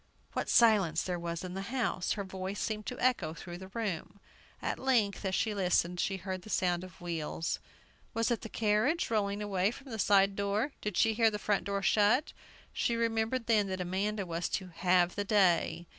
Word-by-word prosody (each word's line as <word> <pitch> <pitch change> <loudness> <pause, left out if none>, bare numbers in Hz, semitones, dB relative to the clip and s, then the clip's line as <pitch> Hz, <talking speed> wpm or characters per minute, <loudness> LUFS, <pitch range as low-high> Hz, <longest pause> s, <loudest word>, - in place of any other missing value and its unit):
What - - -2
silence 200 -9 +4
there 180 -1 -2
was 170 +1 -4
in 180 -1 -5
the 190 - -4
house! 240 -8 0
Her 200 - -3
voice 190 +1 -5
seemed 215 -1 -3
to 250 - -5
echo 195 -11 +1
through 175 +1 -8
the 190 - -9
room. 200 -2 -4 0.4
At - - -3
length, 235 -7 +1
as 190 0 0
she 220 - 0
listened, 180 -2 +1
she 195 +1 0
heard 185 0 -5
the 215 - -12
sound 180 -3 +1
of 185 -2 -12
wheels. 165 -1 -3 0.6
Was 230 +1 +1
it 235 - 0
the 225 - -7
carriage, 225 +10 +1
rolling 205 -1 0
away 195 -1 +1
from 270 +3 -10
the 220 - -5
side 195 0 +4
door? 200 +7 0
Did 210 -3 -3
she 225 - +4
hear 225 0 +4
the 210 - -3
front 205 -3 0
door 200 0 -2
shut? 215 - +3 0.4
She 235 - 0
remembered 230 +1 0
then 215 -3 +3
that 185 -1 -3
Amanda 195 +3 -1
was 170 0 -2
to 185 -2 -3
"have 180 0 +2
the 205 - -2
day." 175 -4 +2
200 Hz, 200 wpm, -31 LUFS, 180-220 Hz, 0.6 s, silence